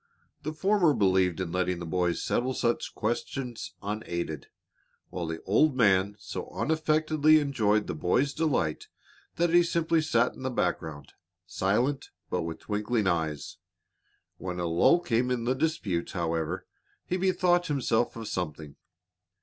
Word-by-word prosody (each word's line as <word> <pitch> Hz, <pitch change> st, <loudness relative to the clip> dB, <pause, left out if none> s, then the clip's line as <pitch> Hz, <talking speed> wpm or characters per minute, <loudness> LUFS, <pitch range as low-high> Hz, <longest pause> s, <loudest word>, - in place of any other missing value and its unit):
The 155 Hz, 0 st, -3 dB
former 180 Hz, -2 st, +3 dB
believed 95 Hz, -3 st, +2 dB
in 90 Hz, -3 st, -3 dB
letting 90 Hz, 0 st, 0 dB
the 85 Hz, -, -6 dB
boys 90 Hz, 0 st, 0 dB
settle 130 Hz, +2 st, 0 dB
such 120 Hz, -1 st, -1 dB
questions 120 Hz, +2 st, -3 dB
unaided, 85 Hz, -8 st, -4 dB, 0.6 s
while 85 Hz, -2 st, -4 dB
the 80 Hz, 0 st, -5 dB
old 130 Hz, +8 st, +3 dB
man 100 Hz, -3 st, +3 dB
so -, -, -6 dB
unaffectedly 155 Hz, 0 st, +3 dB
enjoyed 110 Hz, -8 st, +1 dB
the -, -, -3 dB
boys' 125 Hz, -, +1 dB
delight 145 Hz, -, 0 dB, 0.5 s
that 170 Hz, +1 st, +1 dB
he 175 Hz, +1 st, +7 dB
simply 170 Hz, -1 st, +1 dB
sat 125 Hz, -6 st, +2 dB
in -, -, -12 dB
the 130 Hz, -, -1 dB
background, 75 Hz, -, -3 dB, 0.3 s
silent, 110 Hz, +10 st, 0 dB, 0.2 s
but -, -, 0 dB
with 80 Hz, 0 st, -4 dB
twinkling 105 Hz, +1 st, -1 dB
eyes. 80 Hz, -5 st, -1 dB, 0.8 s
When 90 Hz, -1 st, -4 dB
a 90 Hz, -, -1 dB
lull 85 Hz, -, +4 dB
came 125 Hz, -6 st, +1 dB
in 125 Hz, -2 st, -1 dB
the 125 Hz, +2 st, +1 dB
dispute, 130 Hz, -, -1 dB
however, 85 Hz, -1 st, -2 dB, 0.4 s
he 180 Hz, -, -1 dB
bethought 180 Hz, -1 st, +2 dB
himself 120 Hz, -5 st, 0 dB
of 115 Hz, -1 st, -6 dB
something. 80 Hz, -7 st, -5 dB
115 Hz, 140 wpm, -28 LUFS, -, 0.8 s, he